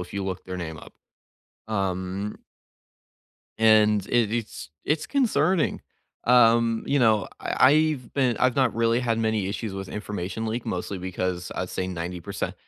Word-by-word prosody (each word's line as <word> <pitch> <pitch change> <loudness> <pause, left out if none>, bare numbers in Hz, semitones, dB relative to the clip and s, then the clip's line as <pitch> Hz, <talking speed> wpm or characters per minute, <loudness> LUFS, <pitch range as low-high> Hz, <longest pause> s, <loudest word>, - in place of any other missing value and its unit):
if 90 +1 -8
you 100 -1 -2
look 95 -1 -4
their 90 0 -5
name 80 -3 -5
up. - - -13 0.7
Um 95 0 -2 1.2
and 105 -2 +4
it 115 -3 +2
it's 110 -8 -4
it's 150 +1 0
concerning, 215 - +1 0.4
um, 115 -1 +4
you 140 - +2
know, 110 -6 +3
I - - +3
I've 155 -4 +1
been 130 -4 +2
I've 130 -1 +2
not 135 -2 +2
really 115 +1 +2
had 115 -2 0
many 110 -3 0
issues 105 +1 -4
with 95 -1 -6
information 105 +1 -4
leak 115 +2 -3
mostly 95 +2 -3
because 90 -1 -3
I'd 90 - -3
say 90 - -2
90% 90 -1 -4
110 Hz, 150 wpm, -25 LUFS, 95-120 Hz, 1.2 s, and